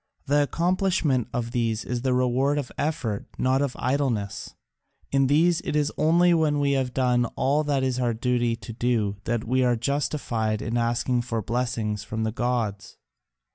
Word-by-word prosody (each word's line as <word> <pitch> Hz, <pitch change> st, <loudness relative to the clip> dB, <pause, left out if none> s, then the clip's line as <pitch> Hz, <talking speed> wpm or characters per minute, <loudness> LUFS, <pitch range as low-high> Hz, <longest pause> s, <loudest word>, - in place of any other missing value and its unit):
The 145 Hz, +1 st, +3 dB
accomplishment 170 Hz, -, +1 dB
of 120 Hz, -1 st, -3 dB
these 115 Hz, -3 st, -1 dB
is 120 Hz, -1 st, -3 dB
the 130 Hz, 0 st, +1 dB
reward 130 Hz, +3 st, +1 dB
of 140 Hz, -4 st, -3 dB
effort, 135 Hz, -9 st, -2 dB
not 130 Hz, +1 st, +2 dB
of 140 Hz, -3 st, -1 dB
idleness; 125 Hz, -6 st, -2 dB, 0.6 s
in 135 Hz, -1 st, +3 dB
these 165 Hz, +4 st, +3 dB
it -, -, -3 dB
is 150 Hz, 0 st, +1 dB
only 170 Hz, +3 st, +4 dB
when 155 Hz, -3 st, +2 dB
we 140 Hz, -1 st, +2 dB
have 135 Hz, -2 st, 0 dB
done 125 Hz, -1 st, +2 dB
all 140 Hz, +4 st, +1 dB
that 140 Hz, -2 st, +1 dB
it -, -, +2 dB
is 130 Hz, -1 st, -1 dB
our 120 Hz, -2 st, 0 dB
duty 120 Hz, 0 st, 0 dB
to 115 Hz, 0 st, -9 dB
do 110 Hz, -4 st, 0 dB
that 120 Hz, -1 st, -1 dB
we 130 Hz, +2 st, +1 dB
are 125 Hz, -1 st, +3 dB
justified 120 Hz, -4 st, -1 dB
in 115 Hz, +2 st, -3 dB
asking 120 Hz, +1 st, +1 dB
for 115 Hz, -2 st, -3 dB
blessings 115 Hz, -3 st, -2 dB
from 110 Hz, +1 st, -3 dB
the 110 Hz, -, -1 dB
gods." 115 Hz, -4 st, -2 dB
125 Hz, 175 wpm, -25 LUFS, 115-140 Hz, 0.6 s, only